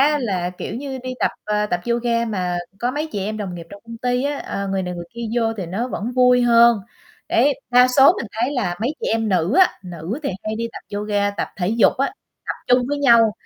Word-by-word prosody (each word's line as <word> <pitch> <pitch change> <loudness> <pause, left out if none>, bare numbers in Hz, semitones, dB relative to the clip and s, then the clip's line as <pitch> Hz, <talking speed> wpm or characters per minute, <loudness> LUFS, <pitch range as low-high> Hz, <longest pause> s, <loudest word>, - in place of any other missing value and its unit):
á 295 +2 +4
là, 185 -8 -1
kiểu - - -5
như, 265 +2 -5
đi 255 0 -4
tập, - - +2
ờ, 210 0 0
tập 175 -4 -1
yoga 235 0 +1
mà 180 -5 -2 0.2
có 240 +4 0
mấy 300 +4 -3
chị - - -2
em 215 +2 -3
đồng 200 -4 -5
nghiệp 170 -1 -8
trong 200 - -12
công 230 0 -9
ty 250 +1 0
á, 285 0 -1
ờ, 200 0 -4
người 190 0 -1
này 180 -1 -4
người 175 0 -6
kia 235 - -6
vô 225 -1 +2
thì 190 -4 -4
nó 220 +9 -3
vẫn 235 +1 -4
vui 250 -1 +4
hơn. 235 -1 +6 0.5
Đấy, 275 +4 +3 0.2
đa 250 +1 +6
số 270 +5 +6
mình - - -4
thấy 240 +5 -1
là 210 -10 -1
mấy 255 +7 -1
chị - - -2
em 225 -1 0
nữ 185 - +1
á, 375 - +7 0.2
nữ 175 - -5
thì 280 - -1
hay 215 0 -3
đi 230 +1 -2
tập 205 - -8
yoga, 205 -1 0
tập 200 - -3
thể 180 -2 -1
dục 225 0 +4
á, 275 - +1 0.4
tập - - -2
chung 250 0 +3
với 290 0 -1
nhau, 235 -5 +5
230 Hz, 250 wpm, -21 LUFS, 200-250 Hz, 0.5 s, á